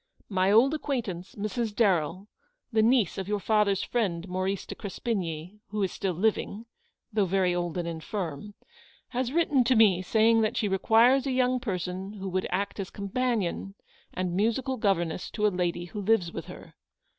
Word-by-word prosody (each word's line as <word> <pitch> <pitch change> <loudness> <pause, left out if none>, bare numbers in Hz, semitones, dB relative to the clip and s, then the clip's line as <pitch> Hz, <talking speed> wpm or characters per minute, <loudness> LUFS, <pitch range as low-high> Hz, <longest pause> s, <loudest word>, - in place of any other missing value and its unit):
My 190 -1 +2
old 240 +7 +5
acquaintance, 230 - -3
Mrs. 215 +1 -3
Darrell, 185 -3 +1 0.5
the 220 - +4
niece 225 -5 +3
of 190 - -4
your 210 0 0
father's 205 -2 +2
friend, 195 -7 -1
Maurice 185 +1 -2
de - - -6
Crespigny, 190 -4 -4
who 210 -1 -2
is 190 - 0
still 185 -3 -2
living, 215 +3 -1 0.5
though 205 -3 +2
very 185 -1 +2
old 175 -1 -2
and 175 -1 -2
infirm, 170 +2 -5 0.5
has 250 0 -2
written 295 -5 +3
to 255 +1 +3
me 205 -5 +5
saying 225 +4 +3
that 215 - 0
she 210 - +1
requires 230 +7 +4
a - - 0
young 255 0 +2
person 190 -3 -4
who 195 -2 -5
would 185 0 -1
act 200 +3 -2
as 195 -1 -4
companion 200 -2 -2 0.4
and 180 -1 -2
musical 235 +6 0
governess 180 -6 0
to 210 - -1
a - - +6
lady 175 -2 -2
who 205 +4 -6
lives 195 -4 +2
with - - -5
her. - - -11
200 Hz, 170 wpm, -28 LUFS, 185-225 Hz, 0.5 s, a